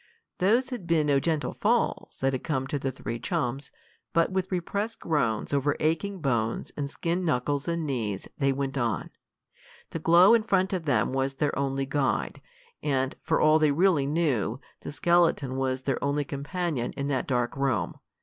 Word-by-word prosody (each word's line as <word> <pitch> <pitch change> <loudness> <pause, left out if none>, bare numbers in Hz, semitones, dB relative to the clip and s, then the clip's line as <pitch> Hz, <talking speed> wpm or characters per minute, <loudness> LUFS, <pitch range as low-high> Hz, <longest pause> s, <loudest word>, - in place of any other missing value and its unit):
Those 235 +8 +2
had 225 -9 -5
been 165 -3 +3
no 140 -2 +3
gentle 155 0 -1
falls - - 0
that 135 0 +2
had 130 - -3
come 135 -5 -1
to 140 +2 -2
the 135 0 -2
three 120 -2 -5
chums, 130 +3 -2 0.4
but 165 +2 +3
with 190 0 -1
repressed 200 +5 -2
groans 145 -8 0
over 140 +1 +2
aching 165 +5 -1
bones 115 -5 -1
and 140 -1 -3
skinned 170 +4 -2
knuckles 145 -2 0
and 170 -1 -1
knees 110 -9 -3
they 135 -1 +3
went 135 0 -2
on. 120 -3 -1 0.8
The 165 - -3
glow 175 +6 +6
in 230 - +5
front 195 -2 +1
of 180 -4 -2
them 140 -3 +1
was 135 0 0
their 145 +1 0
only 135 0 -1
guide, 135 -4 -1 0.4
and, 135 -3 0
for - - +1
all 155 +1 +5
they 155 -2 +4
really 160 -3 +3
knew, 140 - 0 0.2
the - - -7
skeleton 150 -3 +2
was 130 -1 -1
their 135 0 -1
only 140 +1 0
companion 145 -2 -3
in 140 - -3
that 135 -2 -1
dark 120 -2 0
room. 135 -4 0
145 Hz, 180 wpm, -27 LUFS, 135-170 Hz, 0.8 s, glow